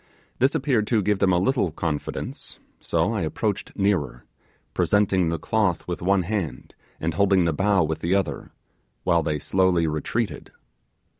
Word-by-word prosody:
This 130 +3 +3
appeared 130 -7 +1
to 110 -4 +2
give 105 0 +1
them 100 -2 +3
a 90 - +3
little 100 - +1
confidence, 75 -1 -4 0.2
so - - 0
I - - -1
approached - - -2
nearer, 90 -11 0 0.5
presenting 95 -4 +2
the 85 - -1
cloth 105 -4 0
with 85 - -4
one 95 +1 +2
hand, 95 -4 -4 0.3
and 80 +1 -1
holding 95 0 +3
the 85 - +1
bough 95 +2 +2
with 80 0 -2
the 85 +4 +1
other, 100 -4 -2 0.5
while 85 0 +3
they 75 -1 -1
slowly 90 +2 +2
retreated. 75 -1 -3
95 Hz, 155 wpm, -24 LUFS, 85-100 Hz, 0.5 s, This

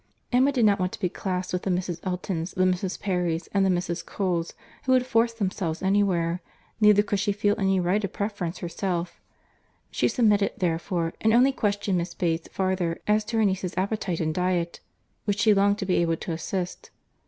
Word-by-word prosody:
Emma 260 +3 +4
did 250 -5 +2
not 200 -2 +4
want 185 0 0
to - - -8
be 180 - 0
classed 185 0 -3
with 180 - 0
the - - -3
Mrs. 180 -2 -1
Eltons, 180 -2 -3
the 185 - +2
Mrs. 185 0 0
Perrys, 175 -4 -1
and 200 -1 +3
the 190 - +3
Mrs. 175 -1 -1
Coles, 175 -4 -2 0.3
who 260 - +3
would 255 -1 +3
force 235 -2 +2
themselves 190 -6 -2
anywhere; 185 -3 +1 0.4
neither 210 -1 +6
could 205 -1 -1
she 205 +1 +1
feel 205 0 +1
any 195 -1 +2
right 185 +4 +1
of 195 - -2
preference 200 -4 -3
herself—she 175 0 -5
submitted, 210 -5 +2
therefore, 170 -1 -1
and 220 0 +3
only 255 +3 +5
questioned 205 -6 0
Miss 170 0 -4
Bates 165 -2 -1
farther 185 -3 -1
as 210 +1 +2
to 225 +1 -2
her 220 - +4
niece's 190 -2 -1
appetite 190 -2 -1
and 155 -1 0
diet, 180 -1 -1 0.5
which 205 -1 0
she 220 -2 +5
longed 200 +1 +3
to 195 - -3
be 185 - +1
able 165 -1 +1
to 170 - -5
assist. 180 +2 -4
190 Hz, 190 wpm, -26 LUFS, 175-205 Hz, 0.5 s, neither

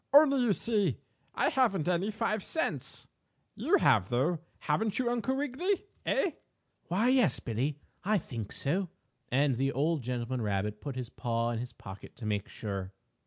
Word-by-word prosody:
"Only, 280 -3 +8
you 235 -4 +4
see, 205 - +1 0.4
I - - +3
haven't 210 - +2
any 180 +3 +1
five 215 -1 -1
cents. 165 - -2 0.5
You - - +3
have, 90 - +4
though, 145 +8 +1 0.2
haven't 210 +7 0
you 245 -2 +1
Uncle 245 +2 0
Wiggily? 300 +9 -1 0.2
Eh?" 375 - +2 0.6
"Why, 205 +8 +2
yes, 250 - +4
Billie, 130 +6 -1 0.3
I 215 +2 +3
think 115 - -5
so," 180 +6 -1 0.4
and 135 0 +3
the 135 +2 +1
old 150 +3 +1
gentleman 125 +1 -2
rabbit 105 0 -1
put 140 -3 -5
his 125 -2 -5
paw 115 -1 -1
in 115 - -2
his 125 +1 -5
pocket 95 -3 -10
to 115 - -8
make 105 -2 -1
sure. 100 -3 -5
150 Hz, 165 wpm, -31 LUFS, -, 0.6 s, Only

